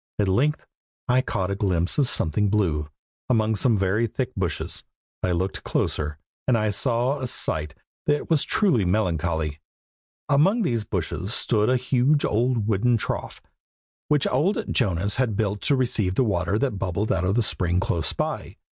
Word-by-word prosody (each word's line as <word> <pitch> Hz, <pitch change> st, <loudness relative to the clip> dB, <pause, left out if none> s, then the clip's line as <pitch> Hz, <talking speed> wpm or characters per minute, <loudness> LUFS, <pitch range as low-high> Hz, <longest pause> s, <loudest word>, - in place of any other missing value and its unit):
At 105 Hz, -, +1 dB
length 135 Hz, +11 st, +1 dB, 0.4 s
I 125 Hz, +1 st, +3 dB
caught 95 Hz, -6 st, -2 dB
a -, -, 0 dB
glimpse 90 Hz, -, +1 dB
of 140 Hz, -, +3 dB
something 105 Hz, -1 st, +1 dB
blue, 80 Hz, -8 st, 0 dB, 0.4 s
among 110 Hz, -3 st, +2 dB
some 110 Hz, +2 st, +2 dB
very 100 Hz, +4 st, +1 dB
thick 130 Hz, +3 st, -3 dB
bushes. 90 Hz, -6 st, -2 dB, 0.4 s
I 90 Hz, -, 0 dB
looked 95 Hz, +2 st, -2 dB
closer, 75 Hz, 0 st, -1 dB, 0.3 s
and 125 Hz, -3 st, +4 dB, 0.2 s
saw 125 Hz, +5 st, +1 dB
a 130 Hz, -, -3 dB
sight 75 Hz, -, -1 dB, 0.3 s
that 145 Hz, 0 st, +1 dB
was 160 Hz, -4 st, +2 dB
truly 175 Hz, -, +2 dB
melancholy. 85 Hz, -5 st, -1 dB, 0.7 s
Among 190 Hz, +11 st, +3 dB
these 115 Hz, -, -1 dB
bushes 90 Hz, +1 st, -2 dB
stood 110 Hz, -2 st, +1 dB
a 130 Hz, -, +3 dB
huge 130 Hz, +3 st, +2 dB
old 115 Hz, 0 st, +1 dB
wooden 115 Hz, +3 st, +2 dB
trough, -, -, -4 dB, 0.6 s
which 150 Hz, -2 st, +2 dB
old 195 Hz, -, 0 dB
Jonas 100 Hz, -2 st, +1 dB
had 120 Hz, -6 st, 0 dB
built 105 Hz, -2 st, -1 dB
to 140 Hz, -, +2 dB
receive 115 Hz, -7 st, 0 dB
the 130 Hz, -, +3 dB
water 100 Hz, -3 st, 0 dB
that 115 Hz, -5 st, -1 dB
bubbled 95 Hz, +4 st, -1 dB
out 90 Hz, -, 0 dB
of 95 Hz, +5 st, +1 dB
a 120 Hz, -, +3 dB
spring 90 Hz, -3 st, +1 dB
close 80 Hz, -6 st, 0 dB
by. -, -, -4 dB
105 Hz, 165 wpm, -24 LUFS, 90-125 Hz, 0.7 s, and